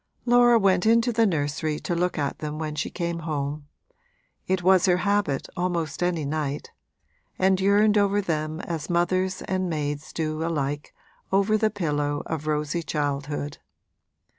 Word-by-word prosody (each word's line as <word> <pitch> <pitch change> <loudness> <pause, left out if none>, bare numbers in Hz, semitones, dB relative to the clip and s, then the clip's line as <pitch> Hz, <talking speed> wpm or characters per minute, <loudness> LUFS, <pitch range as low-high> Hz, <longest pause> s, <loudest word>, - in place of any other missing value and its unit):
Laura 240 -1 +6
went 195 -2 +3
into 230 +2 +4
the 225 0 +3
nursery 150 -2 -1
to - - -3
look 175 +1 0
at 145 -2 -2
them 150 0 -4
when 155 -1 -3
she 150 - -2
came 170 -1 -3
home 145 -2 -3 0.8
it 185 -1 0
was 185 +1 +5
her 180 -1 +4
habit 200 -9 +1
almost 175 -4 -2
any 175 -4 0
night 145 -1 -3 0.7
and 190 0 +3
yearned 205 +2 +4
over 200 0 +2
them 155 -4 -2
as 165 -3 -5
mothers 185 +2 0
and 185 -1 -1
maids 150 -2 -3
do 155 -1 -2
alike 145 -3 -2 0.4
over 200 +2 +3
the 215 0 +2
pillow 145 -7 -1
of 155 -1 -4
rosy 150 +2 -1
childhood. 145 -1 -3
170 Hz, 150 wpm, -25 LUFS, 150-190 Hz, 0.8 s, Laura